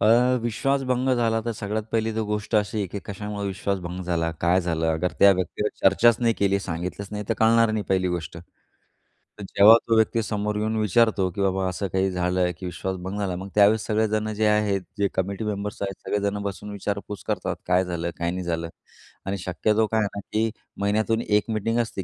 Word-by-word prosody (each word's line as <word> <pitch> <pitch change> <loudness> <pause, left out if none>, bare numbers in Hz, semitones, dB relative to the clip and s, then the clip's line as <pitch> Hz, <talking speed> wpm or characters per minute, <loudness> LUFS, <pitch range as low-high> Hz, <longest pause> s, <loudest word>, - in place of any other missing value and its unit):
अ, 125 +3 +4
विश्वास 135 +4 0
भंग 130 0 0
झाला 115 -2 +1
तर, 120 - -1
सगळ्यात 105 0 -3
पहिली 115 0 +1
तर 110 - -1
गोष्ट 105 +1 -1
अशी 105 +1 0
आहे 100 - -1
की 100 - -5
कशामुळे 105 0 -5
विश्वास 100 +1 -2
भंग 90 +1 -6
झाला? 85 -2 0
काय 90 +2 +3
झालं? 80 -2 -1
अगर 80 +2 -1
त्या 100 0 +8
व्यक्तीगत 95 +3 -2
चर्चाच 110 +4 +5
नाही 115 -1 +2
केली. 100 -1 +2
सांगितलंच 90 +2 -5
नाही 105 0 -4
तर, 115 - +1
कळणार 115 0 +4
नाही 110 -1 -1
पहिली 95 -1 +2
गोष्ट. 85 -1 -4 1.0
तर - - -6
जेव्हा 105 +3 +7
तो 115 - +3
व्यक्ती 110 +1 +3
समोर 105 0 -2
येऊन 110 +1 -1
विचारतो, 110 -2 +2
"की 100 - -4
बाबा 95 -1 +1
असं 95 +2 -3
काही 95 0 +2
झालं? 90 0 +1
की 95 - -6
विश्वास 90 +2 -4
भंग 95 +3 -4
झाला." 95 -3 -1
मग 95 +2 -6
त्यावेळेस 105 +1 +5
सगळेजण 110 0 0
जे 110 +1 0
आहेत, 105 -2 +2 0.2
जे 100 0 +2
कमिटी 100 +3 -2
मेंबर्स 105 0 -4
आहेत 100 -2 -4
सगळेजणं 100 0 -1
बसून 100 +1 -5
विचारपूस 100 -1 -4
करतात, - - -1
"काय 90 +1 +3
झालं? 85 -1 -3
काय 85 0 -1
नाही 90 +1 -4
झालं." 85 -1 -2 0.6
आणि 100 +1 -2
शक्यतो 105 +5 +1
काय 110 +1 0
आहे 105 - +1
ना, - - -3
की 110 +1 +2 0.3
महिन्यातून 110 +3 +1
एक 105 0 +3
मीटिंग 115 +1 0
असते, 110 -4 -2
100 Hz, 205 wpm, -24 LUFS, 95-110 Hz, 1.0 s, त्या